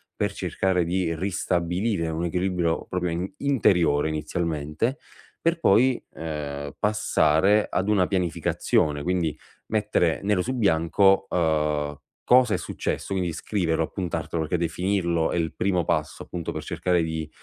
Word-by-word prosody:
per 105 -1 -1
cercare 90 -1 0
di 90 -1 0
ristabilire 90 +1 -1
un 80 +2 -2
equilibrio 90 -1 0
proprio 90 -2 -2
in 90 +8 -3
interiore 90 - +2
inizialmente, 80 - -2 0.4
per 165 0 +1
poi, 125 0 +4
ehm, 75 -3 -5
passare 105 -2 +3
ad 95 +3 -1
una 100 -4 +3
pianificazione, 85 -5 0
quindi 85 -3 0 0.3
mettere 105 -6 +1
nero 100 -2 +2
su 130 +7 -2
bianco, 95 -1 +3
uhm, 75 -3 0 0.3
cosa 125 -3 +5
è - - +2
successo, - - -3
quindi 90 -3 -1
scriverlo, 80 -2 -1
appuntartelo 80 -2 -3
perché 85 +3 -1
definirlo 85 0 0
è - - -1
il 80 -1 -1
primo 90 -3 +1
passo 75 0 -1
appunto 85 -3 -5
per - - -5
cercare 90 -2 0
di, 80 -1 -3
85 Hz, 135 wpm, -25 LUFS, 80-95 Hz, 0.4 s, cosa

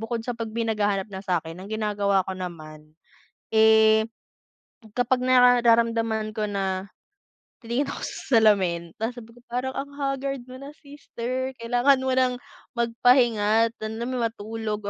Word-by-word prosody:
bukod 225 0 -4
sa 245 - -2
pag 230 -1 -5
may 230 +1 -3
naghahanap 205 -3 0
na 190 - -5
sakin 175 -2 -3
ang 195 - -9
ginagawa 205 -3 0
ko 190 - -4
naman, 155 -4 -9 0.6
eh 220 0 +6 0.9
kapag 250 +1 +1
nararamdaman 235 -3 +3
ko 215 -1 -2
na, 195 -1 -2 0.8
titingin 240 +5 -1
ako - - -6
sa - - -5 0.2
salamin 185 -6 +3
tapos 225 +2 -2
sabi 235 -2 -11
ko 240 - -18
parang 250 +2 -3
ang 280 +1 -6
haggard 275 -2 -3
mo 255 +1 -11
na 280 +2 -10
sister 260 -3 -6
kailangan 245 +3 +2
mo 260 - 0
ng 255 -1 +2 0.4
magpahinga 230 -2 +3
at - - -41
alam 220 +1 -5
mo 255 0 -3
yun 235 - 0
matulog 220 -1 -5
225 Hz, 155 wpm, -25 LUFS, 205-250 Hz, 0.9 s, eh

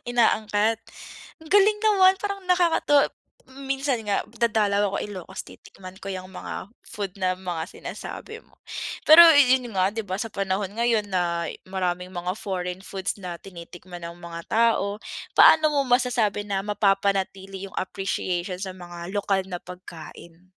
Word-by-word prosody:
inaangkat. 220 -2 +2 0.6
Ang 315 - -13
galing 410 +1 +5
naman 385 -3 +5
parang 400 -1 -3
nakakatuwa 335 -5 +3 0.4
mm, 270 +1 -11
minsan 270 -2 0
nga 200 - +1
dadalaw 210 -3 +1
ako - - +1
Ilocos 190 -2 -7
titikman 185 -1 -13
ko 195 - -7
yang 185 0 -7
mga 185 - -7 0.2
food 200 -3 -5
na 185 0 +2
mga 180 -3 -4
sinasabi - - -8
mo. - - -28 0.5
Pero 315 +3 +11
yun 260 -3 +5
nga, 185 0 +3
'di 225 - -3
ba, 185 - -2
sa 225 - -3
panahon 195 0 -2
ngayon 230 -3 +1
nay 175 -3 -1
maraming 180 -1 -2
mga 180 +1 -2
foreign 180 -2 -4
foods 195 0 -4
na 180 -2 -5
tinitikman 175 -1 -11
ang 170 0 -7
mga 170 -1 -7
tao. 220 -3 +2 0.4
Paano 310 -1 +7
mo 285 - +2
masasabi 245 -5 +1
na 195 -1 -1
mapapanatili 195 -1 0
yung - - -15
appreciation 185 -1 -3
sa 190 -1 -4
mga 175 -1 -9
lokal 195 -2 0
na 180 - -4
pagkain? 175 0 -12
195 Hz, 150 wpm, -25 LUFS, 185-235 Hz, 0.6 s, Pero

